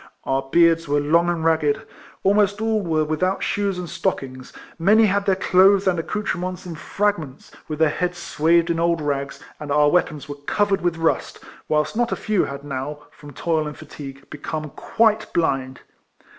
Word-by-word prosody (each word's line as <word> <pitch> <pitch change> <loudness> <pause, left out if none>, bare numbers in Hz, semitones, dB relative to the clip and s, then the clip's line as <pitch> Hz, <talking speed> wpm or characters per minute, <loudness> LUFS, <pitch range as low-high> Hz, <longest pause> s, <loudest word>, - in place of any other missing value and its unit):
Our 135 0 0
beards 165 -1 +4
were 145 +1 +2
long 165 +4 +2
and 165 -2 -2
ragged; 155 -3 +1 0.4
almost 205 +1 +3
all 220 -1 +1
were 160 -4 0
without 185 +5 -1
shoes 200 -2 -1
and 180 -1 -5
stockings; 130 -4 -3 0.3
many 210 +6 +5
had 200 0 0
their 190 - +4
clothes 195 +1 +4
and 180 -2 +2
ac 165 - -5
coutrements 185 -4 -3
in 175 - -6
fragments, 165 -5 -3 0.2
with 155 - -4
their 160 0 +4
heads 180 +2 -2
swathed 170 0 +2
in 165 - -1
old 170 0 +2
rags, 140 -2 -3 0.2
and 150 -1 -6
our 145 0 +4
weapons 155 -5 0
were 145 - -5
covered 200 -2 +1
with 175 -1 0
rust; 165 0 0 0.3
whilst 150 +2 0
not 240 +1 0
a - - +1
few 215 -4 0
had 140 0 -7
now, 145 +1 -5
from 145 -1 -13
toil 160 +1 -1
and 150 - -7
fatigue, 140 -3 -10
become 155 0 -5
quite 220 +5 +1
blind. 135 -6 -1
165 Hz, 180 wpm, -22 LUFS, 150-190 Hz, 0.4 s, many